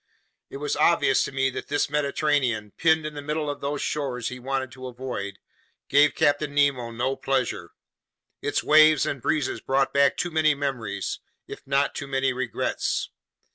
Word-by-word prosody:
It - - -7
was 145 +1 -2
obvious 155 -3 +3
to - - -6
me 135 0 0
that - - -6
this 145 0 0
Mediterranean, 140 -7 0
pinned 160 -1 +2
in 155 - -4
the 145 - -6
middle 150 0 -2
of 145 - -8
those 145 +1 -2
shores 130 -6 -2
he 125 0 -8
wanted 130 0 -3
to 130 +1 -8
avoid, 120 -6 -5 0.5
gave 145 +1 +4
Captain 145 0 +1
Nemo 140 -5 +2
no 125 +4 -2
pleasure. 135 -3 -2 0.7
Its 145 - -1
waves 155 -1 +6
and 140 - -3
breezes 150 +2 -1
brought 135 +1 +1
back 140 0 +3
too 175 - -2
many 155 -2 +3
memories, 120 -8 -3 0.3
if - - -9
not 140 +1 +1
too 140 - -6
many 135 -1 0
regrets. 125 -2 -2
140 Hz, 170 wpm, -25 LUFS, 130-145 Hz, 0.7 s, waves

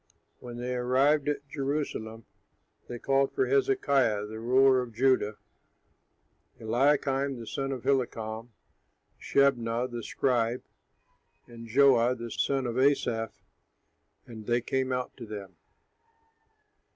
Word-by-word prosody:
When 120 -1 -9
they 125 +1 -3
arrived 135 +4 +2
at 145 -1 -3
Jerusalem, 135 -6 -4 0.6
they 120 - -6
called 135 +2 +1
for 400 - +2
Hezekiah 140 - +2
the 110 +1 -8
ruler 130 +2 +4
of 120 -3 -8
Judah, 120 -4 +2 1.2
Eliakim, 135 +3 +1
the 115 - -8
son 135 +5 -3
of 130 -3 -5
Hilkiah, 115 -4 -1 0.7
Shebnah, 125 -3 +1
the 120 -1 -5
scribe, 120 0 0 0.8
and 115 -1 -11
Joah, 125 -1 +4
the 115 0 -7
son 135 +3 0
of 120 +1 -2
Asaph, 120 -5 0 0.8
and 110 -3 -11
they 120 0 +2
came 130 +2 -1
out 125 0 -3
to 120 -3 -9
them. 100 -3 -8
125 Hz, 115 wpm, -28 LUFS, 115-135 Hz, 1.2 s, ruler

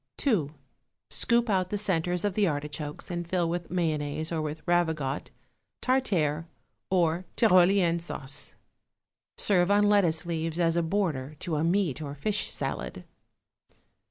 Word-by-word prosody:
2. 165 - 0 0.6
Scoop 235 0 +3
out 185 -3 +1
the 205 - -1
centres 180 -2 0
of 205 - 0
the 205 0 +2
artichokes 150 +1 -4
and 175 -1 -3
fill 175 -2 +1
with 170 0 -3
mayonnaise, 155 -3 -1
or 160 -2 -1
with 155 +1 -5
ravigote, 160 -6 0 0.5
tartare 170 - +1 0.4
or 175 -1 +1
tyrolienne 185 -4 +4
sauce. 145 -4 -4 0.8
Serve 180 -3 +3
on 205 +1 +4
lettuce 180 -6 +3
leaves 165 0 -2
as 165 -1 +2
a 170 - +3
border 160 -6 -1
to 170 -4 -3
a 150 - 0
meat 170 -4 +1
or 145 -1 -5
fish 210 +8 -1
salad. - - -4
170 Hz, 135 wpm, -28 LUFS, 155-190 Hz, 0.8 s, tyrolienne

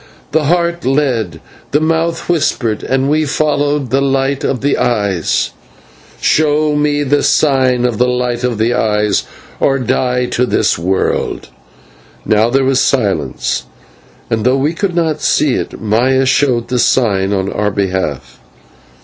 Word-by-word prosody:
"The 155 0 +1
Heart 170 +1 0
led, 130 - -1 0.3
the 145 - +2
Mouth 165 +1 -1
whispered, 125 -10 0
and 135 +1 0
we 155 +2 +1
followed 145 -2 0
the 135 +1 +2
light 135 0 0
of 130 - -1
the 140 +1 +1
Eyes." 100 -8 0 0.7
"Show 150 0 +2
me 145 0 +1
the 145 +1 +1
sign 130 -4 +2
of 120 -4 -1
the 125 - +3
light 125 -1 -1
of 125 -3 -1
the 115 +3 +1
Eyes, 105 -3 0 0.3
or 135 - +2
die 125 0 0
to 125 0 -1
this - - +1
world." 95 +3 -2 0.8
Now 110 +2 +2
there 135 +2 +1
was 135 0 +2
silence, 95 - -1 0.6
and, 110 -1 -1
though 130 +3 +2
we 145 +4 0
could 180 0 -2
not 160 -3 0
see 145 -4 +2
it, - - -4
Maya 125 +5 +1
showed 130 -3 +1
the 125 0 0
sign 100 -7 +2
on 95 -1 -1
our 105 0 0
behalf. 90 -11 -3
130 Hz, 150 wpm, -14 LUFS, 110-145 Hz, 0.8 s, the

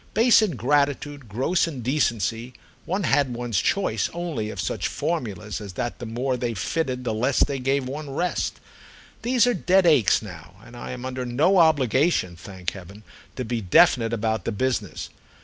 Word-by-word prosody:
Base 230 0 +6
ingratitude, 145 - 0
gross 135 - +1
indecency—one 125 - -2
had 140 -5 +2
one's 120 -4 -1
choice 195 -1 0
only 165 -11 -3
of 100 - -7
such - - -2
formulas 105 - -3
as 100 -3 -8
that 120 +5 -4
the 120 - -6
more 125 +3 -1
they 120 -2 -2
fitted 125 - -2
the 120 - -1
less 125 +5 +2
they 140 -2 -2
gave 135 +1 0
one 145 +2 -6
rest. 175 +6 -2 0.6
These 245 +1 +3
are 245 - +2
dead 185 -1 +3
aches 140 - +4
now, 90 -3 -11
and 120 - -13
I 120 - -7
am 125 0 -6
under 130 0 -4
no 150 +11 +3
obligation, 140 - +3
thank 90 0 -6
heaven, 100 +3 -12 0.3
to 130 - -4
be 115 0 -2
definite 115 +4 +4
about 110 -1 -1
the - - -1
business. 105 -6 -2
125 Hz, 165 wpm, -24 LUFS, 110-150 Hz, 0.6 s, Base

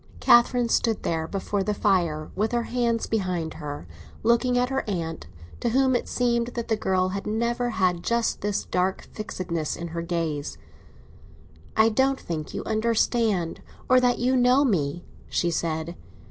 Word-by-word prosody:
Catherine 240 0 +5
stood 225 -2 +1
there 160 -1 -1
before 200 +2 -2
the 210 +2 -1
fire, 170 -7 +1
with 215 +5 0
her 240 -1 +1
hands 235 -1 0
behind 180 -7 -2
her, 145 - -6 0.4
looking 235 +2 +3
at 250 0 +2
her 270 0 -1
aunt, 165 - -3 0.3
to 240 - 0
whom 260 +2 +3
it 240 - -1
seemed 235 -1 +1
that 235 -1 -4
the 220 - +3
girl 185 -3 +1
had 195 +1 -4
never 235 +3 0
had 185 -6 0
just 235 +3 0
this 205 0 -1
dark 185 +1 -1
fixedness 170 -7 -3
in 170 0 -6
her 170 +1 -4
gaze. 165 -4 -3 1.2
"I 220 +1 +6
don't 265 +4 +2
think 155 -3 -5
you 200 - -4
understand—or 220 0 +1
that 245 -1 +2
you 255 +2 +1
know 255 +3 +4
me," 175 - 0 0.2
she 175 - 0
said. 165 0 -2
210 Hz, 160 wpm, -25 LUFS, 170-235 Hz, 1.2 s, I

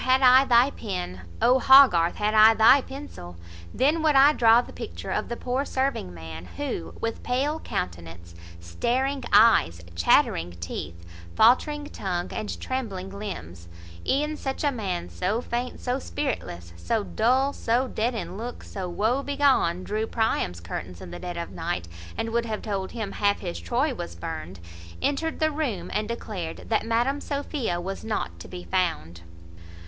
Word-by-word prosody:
had 260 +1 +3
I 255 +1 +7
thy 245 +2 +5
pen! 90 - -5 0.2
O, 255 +2 +5
Hogarth! 260 -12 +7
had 210 +1 0
I 220 +1 +7
thy 230 +6 +7
pencil! 265 - -9 0.4
then 295 +6 +2
would 310 -2 +3
I 280 +2 +7
draw 230 -3 +6
the - - -12
picture - - -7
of - - -2
the 235 - -4
poor 255 +2 -1
serving 265 - -2
man, 80 0 -9
who, 80 0 -4
with 230 0 -3
pale 280 +5 -1
countenance, 85 - -5 0.3
staring 250 - -1
eyes, 205 - +5 0.2
chattering 85 0 +3
teeth, 85 0 -7 0.3
faultering 290 +6 +4
tongue, 180 -2 -3
and 215 - -4
trembling 200 -8 -4
limbs, 90 - -7 0.4
(E'en 300 +3 0
such 270 0 -4
a 290 - +3
man, 195 -8 -3
so 200 +5 -1
faint, 245 +1 -4
so 250 +1 -2
spiritless, 90 - -4
So 220 - -1
dull, 260 +7 +1
so 245 +3 0
dead 240 +1 -1
in 195 -3 -5
look, 240 +3 -6
so 185 -2 -6
woe 220 +9 0
begone, 275 -11 +2
Drew 215 +3 -2
Priam's 220 - -1
curtains 90 +1 -6
in 85 - -9
the - - -7
dead 175 -1 -6
of 170 - -5
night, 165 - -3 0.3
And 225 - -2
would 235 0 0
have 215 -1 -4
told 195 -3 -3
him, 220 -4 -4
half 205 0 +1
his 85 0 -4
Troy 85 0 0
was 85 0 -7
burn'd) 85 +1 -6 0.4
entered 315 +3 -1
the 315 0 +2
room, 240 - -3
and 210 0 -1
declared 205 -7 -6
That 225 0 +1
Madam 245 +5 +1
Sophia 280 - -2
was 195 +2 -5
not 220 -1 -3
to - - -9
be 180 -1 -8
found. 125 - -2
220 Hz, 165 wpm, -26 LUFS, 170-260 Hz, 0.4 s, I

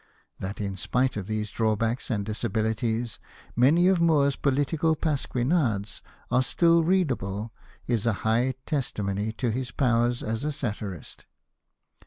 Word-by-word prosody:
That 95 +2 -5
in 100 -2 -3
spite 125 +6 0
of 100 -3 -4
these 110 -1 -2
drawbacks 115 +2 0
and 105 -5 -1
disabilities, 110 +1 -1 0.4
many 150 +9 +5
of 185 -2 +3
Moore's 145 -5 +3
political 145 +3 +1
pasquinades 130 - 0 0.3
are 125 +1 +4
still 165 +5 +3
read 180 -3 +2
able 105 0 -4 0.3
is 120 -2 0
a 115 - +3
high 120 +4 +2
testimony 105 -8 -2
to 120 0 -1
his 125 +2 -3
powers 120 -2 +1
as 110 +3 -3
a 150 - 0
satirist. 105 - -6
120 Hz, 135 wpm, -26 LUFS, 110-140 Hz, 0.4 s, many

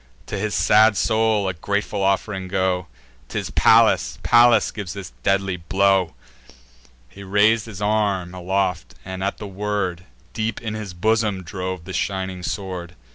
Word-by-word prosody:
To - - -5
his 105 +1 -2
sad 110 -1 +5
soul 110 -3 +2
a 95 - -1
grateful 100 +4 -2
off'ring 95 0 0
go! 95 -1 0 0.4
'Tis - - -4
Pallas, - - +4
Pallas 120 -2 +5
gives 100 -4 -6
this 100 -3 -8
deadly 95 -1 +1
blow." 95 0 +1 0.9
He 100 +11 -14
rais'd 105 +3 +3
his 105 -2 -7
arm 100 -4 0
aloft, 90 -7 -2
and, 95 0 -5
at 100 - -2
the 105 - -7
word, 95 -3 -3 0.3
Deep 110 -1 -2
in 110 -2 -5
his 105 -5 -6
bosom 105 0 +1
drove 90 -1 -5
the 95 - -7
shining 95 -2 -2
sword. 90 -2 -5
95 Hz, 145 wpm, -22 LUFS, 95-105 Hz, 0.9 s, sad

